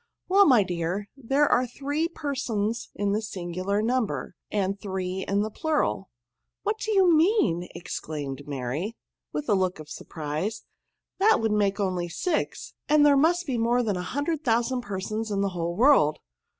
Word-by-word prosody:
'* - - -58
Well, 395 +1 +6
my 245 -7 +6
dear, 180 +3 -3
there 275 +3 +2
are 250 - +3
three 285 +6 -2
persons 240 -8 -2
in 205 0 0
the 210 +2 +1
singular 190 0 -2
number, 245 -1 -1 0.2
and 200 -1 -1
three 190 -1 -3
in 200 +1 +1
the 215 - -4
plural." 295 - -1 0.3
" - - -57
What 430 +1 -1
do 435 - -2
you 375 -5 +5
mean?" 310 - +2
exclaimed 145 -4 -5
Mary, 145 - -3 0.4
with 295 - -4
a 215 - +3
look 185 -2 +1
of 155 -1 -11
surprise^, 155 +9 -4 0.3
" - - -57
that 430 +3 +5
would 225 -1 0
make 205 -1 +1
only 185 -3 -1
SIX, 320 - -2 0.2
and 300 0 +6
there 290 -1 +6
must 345 +5 +3
be 255 -6 -1
more 240 +2 +2
than 210 -4 0
a 180 - -2
hun 285 +10 -3
dred 315 0 -2
thousand 240 0 +1
persons 215 0 -4
in 200 -1 0
the 200 - +1
whole 170 -1 -3
world." 225 - +5
215 Hz, 180 wpm, -26 LUFS, 185-280 Hz, 0.4 s, Well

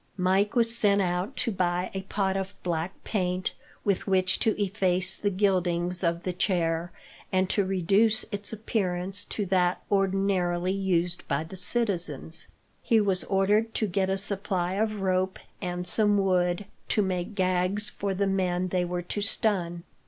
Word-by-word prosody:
Mike 190 +4 +1
was 230 -1 +4
sent 205 -3 +3
out 180 +1 -1
to 230 - 0
buy 180 -1 -1
a 190 - -3
pot 190 0 -1
of 195 0 -3
black 170 +1 -3
paint, 185 -3 -1 0.3
with 200 -1 0
which 185 -1 +2
to 220 -2 +1
efface 185 -2 +1
the 205 - -1
gildings 180 -2 +1
of 170 0 0
the 185 - -2
chair, 170 -2 0 0.4
and 185 0 +1
to 205 - +2
reduce 195 +5 +2
its 205 -1 -4
appearance 195 -3 -1
to 205 0 -3
that 180 -1 +1
ordinarily 190 -2 +1
used 180 -3 0
by 140 +2 0
the 165 +4 -10
citizens. 180 - +2 0.3
He 230 -3 +3
was 195 -3 +1
ordered 205 +4 +1
to 220 - +1
get 190 -1 0
a 195 - 0
supply 190 -2 -1
of 215 0 -1
rope, 185 0 0 0.2
and 180 0 -3
some 210 +1 +3
wood, 185 -1 +1 0.2
to 210 - +2
make 185 +2 -3
gags 185 +2 +1
for 195 -1 -3
the 200 +2 +1
men 185 -2 0
they 180 0 0
were 175 0 -3
to 205 +4 -3
stun. 180 -5 0
190 Hz, 160 wpm, -27 LUFS, 180-200 Hz, 0.4 s, was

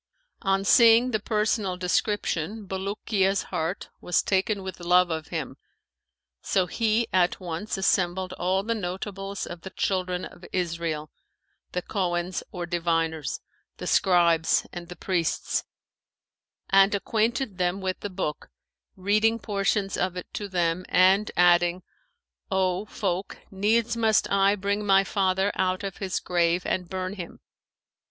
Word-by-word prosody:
On 195 0 +1
seeing 235 +3 +6
the 215 - +1
personal 210 -3 0
description 200 +1 -1
Bulukiya's 195 0 -1
heart 165 +4 -2
was 175 - +1
taken 195 +1 0
with 190 -1 -7
love 180 0 +3
of 160 -1 -3
him, - - -5 0.8
so 190 -2 +1
he 225 +5 +1
at 180 -1 +2
once 180 +3 -4
assembled 185 -1 +1
all 185 +2 0
the 230 +2 -1
notables 195 0 -4
of 170 -1 -8
the 190 - -7
Children 185 -2 -1
of 175 - -13
Israel, 165 -4 -2 0.6
the 180 - -2
Cohens 175 -3 -2
or 175 -1 -4
diviners, 165 -3 -1 0.4
the - - -6
scribes 170 -3 +3
and 175 -1 -7
the 180 - -9
priests, 175 -1 -1 1.1
and 195 +1 +5
acquainted 220 0 -1
them 180 +1 0
with 185 -1 -3
the 205 - -5
book, 180 -6 -4 0.5
reading 215 +4 +2
portions 200 -2 -1
of 185 0 -1
it 180 - -5
to 205 - -4
them 175 -1 0
and, 190 +3 +4
adding, 175 0 +4 0.7
'O 190 0 0
folk, 190 -2 -3
needs 220 +4 +1
must 225 -2 +2
I 200 +1 +4
bring 200 +1 -1
my 195 -1 +5
father 190 0 +1
out 185 +1 0
of 195 -2 -5
his 190 -2 -2
grave 175 0 +1
and 180 -2 -2
burn 185 0 -3
him.' 180 -4 -8
190 Hz, 135 wpm, -26 LUFS, 175-200 Hz, 1.1 s, seeing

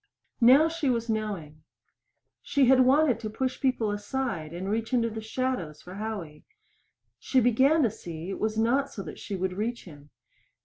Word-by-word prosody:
Now 265 +7 +7
she 325 -3 -1
was 230 -2 0
knowing. 195 -9 -4 0.8
She 280 -2 +2
had 260 +1 +5
wanted 260 -1 +4
to 220 -2 -5
push 260 +4 -3
people 255 -5 +1
aside 205 -6 -3
and 175 +3 -5
reach 225 +4 -2
into 230 -2 +2
the 220 +1 -5
shadows 220 - -3
for 180 - -10
Howie. 200 -7 -6 0.8
She 265 - +2
began 260 +6 +4
to 230 - +2
see 170 -6 -8
that 190 - -5
it - - -5
was 215 0 -1
not 260 +5 +2
so 190 - -7
she 200 - -6
would 185 0 -2
reach 225 +5 -3
him. 145 -4 -14
220 Hz, 175 wpm, -27 LUFS, 190-255 Hz, 0.8 s, Now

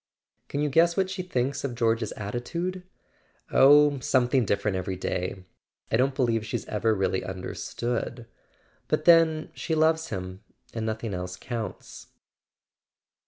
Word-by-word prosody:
"Can 145 - -3
you 150 - +1
guess 170 +4 +3
what 190 -1 +1
she 190 -1 -3
thinks 135 -6 -2
of 130 -3 -3
George's 115 -2 +1
atti¬ 105 +4 -4
tude? 180 +5 -3 0.4
" - - -38 0.3
"Oh, 145 +1 +6
something 125 -1 +2
different 100 0 0
every 95 0 -3
day. 90 0 -3 0.5
I - - +3
don't 130 +3 +2
believe 115 -5 +1
she's 110 - -4
ever 110 +1 0
really 95 -1 0
understood. 120 +6 -4 0.6
But - - 0
then 165 -2 +5
she 160 - -2
loves 160 +1 +2
him, 95 0 -6 0.3
and 110 -1 -3
nothing 110 -1 -3
else 90 0 -5
counts." 115 0 -6
120 Hz, 145 wpm, -27 LUFS, 105-150 Hz, 0.6 s, Oh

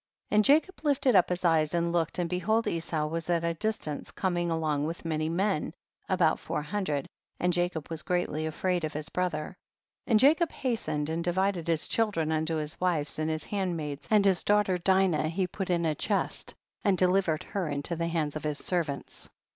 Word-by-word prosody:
52. - - 0
And 210 0 +5
Jacob 320 +6 +3
lifted 275 -5 +2
up 180 - +5
his 180 0 -2
eyes 160 -1 +3
and 170 0 +1
looked, 170 -2 0
and 175 -1 0
behold 215 +6 +1
Esau 165 -2 -1
was 165 +2 -4
at 170 -1 +2
a 170 0 +1
distance, 165 -5 -2
coming 175 -2 -1
along 155 -3 0
with 165 +1 -6
many 155 -1 -1
men, 175 -2 0 0.3
about 180 -4 +3
four 150 - -3
hundred, 150 -4 -2 0.3
and 180 0 +1
Jacob 175 -3 -1
was 160 -1 -3
greatly 160 -3 -1
afraid 175 +2 -1
of 155 0 -2
his 155 +1 -4
brother. 180 -4 -2 0.5
53. - - -4
And 215 - +6
Jacob 320 +6 +4
hastened 155 - -2
and 165 +1 -1
di 175 - +1
vided 190 -2 0
his 165 -2 +1
children 200 -9 0
unto 160 +1 0
his 155 +1 -4
wives 160 -5 0
and 155 0 0
his 155 0 -2
handmaids, 165 -8 -3
and 210 -2 +4
his 190 -2 +3
daughter 205 -3 +2
Dinah 185 -4 +2
he 185 +3 0
put 190 +1 -5
in 170 -1 +1
a 155 - +2
chest, 200 +6 -2 0.3
and 200 -4 +3
deliver 180 -2 +3
ed - - -9
her 190 -6 -3
into 145 +4 -2
the 170 +1 -1
hands 160 -3 -1
of 155 - -5
his 150 -1 -2
servants. 160 -6 -3
170 Hz, 205 wpm, -29 LUFS, 155-190 Hz, 0.5 s, And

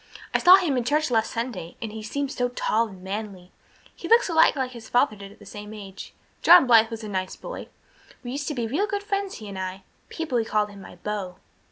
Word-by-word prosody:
"I - - +3
saw 360 +1 +9
him 340 -9 +1
in 245 - 0
church 300 +3 +1
last 225 -2 +2
Sunday 230 -8 -5
and 225 -2 -5
he 220 0 -7
seemed 275 +6 -3
so 245 -2 -1
tall 230 -2 0
and 190 -3 -13
manly. 195 -2 -6 0.4
He - - -7
looks 465 -1 +5
a - - -2
lot 320 -1 +5
like 260 -2 -2
his 235 -3 -11
father 245 -2 +3
did 200 -1 -10
at 205 - -17
the 205 - -16
same 210 +2 -9
age. 195 -2 -10 0.3
John 345 -4 +8
Blythe 225 -2 +6
was 225 -1 -7
a - - -5
nice 185 -2 -3
boy. - - -8 0.6
We 245 - -5
used 285 +2 -4
to 300 - -2
be 240 -2 -1
real 305 - 0
good 405 0 -3
friends, 400 -1 -2
he 215 - -9
and 195 -1 -6
I. 185 +1 -5 0.3
People 280 -8 -1
called 210 -1 0
him 200 -1 -12
my - - -12
beau." 190 -1 -4
225 Hz, 240 wpm, -25 LUFS, 205-285 Hz, 0.6 s, saw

